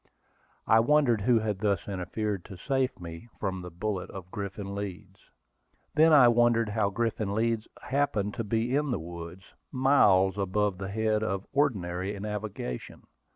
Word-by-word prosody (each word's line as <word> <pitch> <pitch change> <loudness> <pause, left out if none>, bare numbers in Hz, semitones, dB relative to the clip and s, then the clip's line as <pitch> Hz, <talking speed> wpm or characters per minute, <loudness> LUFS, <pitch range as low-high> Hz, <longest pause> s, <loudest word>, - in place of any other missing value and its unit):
I 110 - +5
wondered 125 -3 +3
who 120 +3 +4
had 105 -3 -1
thus 100 -4 0
interfered 100 +1 -3
to 95 - -10
save 130 +4 -1
me 85 +4 -9
from 95 -2 -2
the 90 - -7
bullet 95 +2 -3
of 90 -2 -9
Griffin 100 0 -5
Leeds. 100 -3 -6 0.7
Then 160 +2 +5
I 140 -5 +8
wondered 120 -1 +3
how 105 -1 +1
Griffin 110 -1 -1
Leeds 115 0 0 0.2
happened 130 -8 0
to 115 - -3
be 115 +4 0
in 145 0 +1
the 125 - 0
woods, 85 +2 -8 0.3
miles 105 -8 +4
above 100 0 0
the 95 0 -4
head 110 +1 0
of 100 -2 -2
ordinary 100 -8 0
navigation. 105 - -5
105 Hz, 155 wpm, -28 LUFS, 95-115 Hz, 0.7 s, I